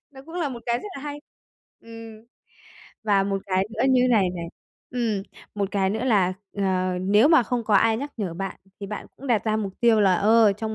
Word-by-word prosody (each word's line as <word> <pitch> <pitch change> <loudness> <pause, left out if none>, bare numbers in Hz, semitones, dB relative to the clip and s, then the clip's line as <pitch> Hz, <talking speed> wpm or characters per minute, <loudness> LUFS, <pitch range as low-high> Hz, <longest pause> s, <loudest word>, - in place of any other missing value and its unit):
Nó 265 - -13
cũng 325 - -11
là 340 -5 -1
một 240 -3 -8
cái 240 0 +1
rất 420 - -8
là 275 - -8
hay. 290 0 -6 0.6
Ừm. 225 -1 -12 0.8
Và 200 -2 +3
một 195 0 -2
cái 190 0 +1
nữa 225 - -2
như 255 -1 +4
này 195 -6 +3
này, 170 -2 -6 0.4
ừm, 230 -5 -1 0.3
một 200 -1 -1
cái 195 -1 +1
nữa 220 +4 -2
là, 200 -7 +3 0.3
ờ, 185 -2 0
nếu 205 +8 +4
mà 320 -6 +6
không 240 0 -2
có 215 - +1
ai 220 +2 +4
nhắc 285 +4 -5
nhở 195 -7 -3
bạn 195 +2 -5 0.2
thì 200 - -5
bạn 210 +1 -6
cũng 275 - -10
đặt 235 -5 +1
ra 215 -1 +1
mục 200 -3 -3
tiêu 230 -2 +4
là, 195 -2 +4
ờ, 215 +2 +4
trong 220 +2 -5
215 Hz, 225 wpm, -24 LUFS, 195-235 Hz, 0.8 s, mà